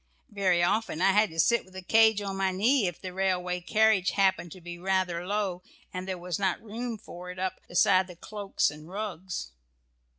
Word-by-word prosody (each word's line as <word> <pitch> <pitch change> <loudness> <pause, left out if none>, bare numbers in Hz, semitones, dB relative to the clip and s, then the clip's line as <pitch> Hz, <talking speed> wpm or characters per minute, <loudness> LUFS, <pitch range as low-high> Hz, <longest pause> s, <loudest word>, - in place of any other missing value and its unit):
Very 185 -4 +2
often 210 -2 0
I 195 +2 +4
had 210 +1 +3
to 165 - -8
sit 235 +7 +4
with 185 0 -19
the 185 - -7
cage 220 +1 +4
on 195 -1 -3
my 195 0 +1
knee 215 +4 +2
if 175 - -5
the 185 -1 -7
railway 180 -1 0
carriage 215 0 +3
happened 190 -3 +2
to 185 - -12
be 175 0 -8
rather 180 -2 0
low, 200 -3 -1 0.3
and 185 +1 -5
there 190 -1 -3
was 175 0 -4
not 190 -2 0
room 230 +1 -5
for 180 -3 -10
it 180 - -8
up 185 0 -3
beside 185 +1 +4
the 180 - -11
cloaks 205 +2 -1
and 150 +2 -12
rugs. 185 - -5
190 Hz, 200 wpm, -28 LUFS, 180-205 Hz, 0.3 s, I